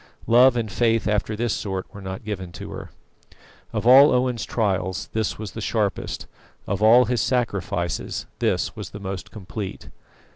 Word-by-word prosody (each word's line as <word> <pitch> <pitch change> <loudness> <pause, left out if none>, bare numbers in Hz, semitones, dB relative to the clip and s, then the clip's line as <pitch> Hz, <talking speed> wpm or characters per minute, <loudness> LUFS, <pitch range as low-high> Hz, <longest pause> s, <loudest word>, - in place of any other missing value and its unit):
Love 125 +2 +6
and 110 -3 -2
faith 115 -1 +1
after 105 +1 0
this 115 0 0
sort 95 -3 -3
were 100 - -9
not 95 +2 -6
given 95 -5 -5
to - - -8
her. - - -7 0.8
Of - - -3
all 135 +4 +8
Owen's 125 -2 +1
trials 95 -4 -1
this 110 -2 -1
was 105 -3 -6
the - - -7
sharpest. - - -2 0.4
Of 100 +1 -2
all 120 +3 +7
his 125 -1 0
sacrifices 100 -7 -1
this - - 0
was - - -7
the 100 - -9
most 95 -2 -6
complete. 100 -1 -7
105 Hz, 160 wpm, -23 LUFS, 95-120 Hz, 0.8 s, all